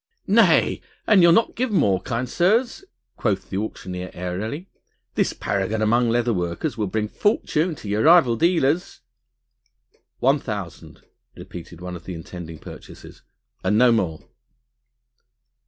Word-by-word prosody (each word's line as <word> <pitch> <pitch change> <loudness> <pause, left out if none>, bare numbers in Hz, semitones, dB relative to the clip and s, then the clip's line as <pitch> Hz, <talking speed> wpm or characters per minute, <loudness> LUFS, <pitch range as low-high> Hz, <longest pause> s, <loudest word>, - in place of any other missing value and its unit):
"Nay! - - +4 0.2
an 205 -4 +5
you'll 170 -1 +7
not 225 +7 +3
give 255 +1 -1
more, 100 - +2
kind 125 0 -3
sirs," 220 - +1 0.3
quoth 105 -5 -2
the 95 - -2
auctioneer 90 -3 -5
airily, 105 - -4 0.5
"this - - +1
paragon 100 +2 -2
among 115 +2 +2
leather 120 0 +1
workers 90 - -2
will 105 -3 -2
bring 105 +2 -2
fortune 165 - 0
to 110 - -10
your 105 +2 0
rival 155 -6 +6
dealers...." 165 - +1 1.2
"One 135 +4 +3
thousand," 100 -9 -7 0.3
repeated 85 -1 -10
one 90 0 -6
of 85 - -11
the 90 - -6
intending 80 0 -8
purchasers, - - -12 0.4
"and 100 +3 +2
no 125 +1 +6
more." 90 -9 -1
110 Hz, 135 wpm, -23 LUFS, 95-155 Hz, 1.2 s, you'll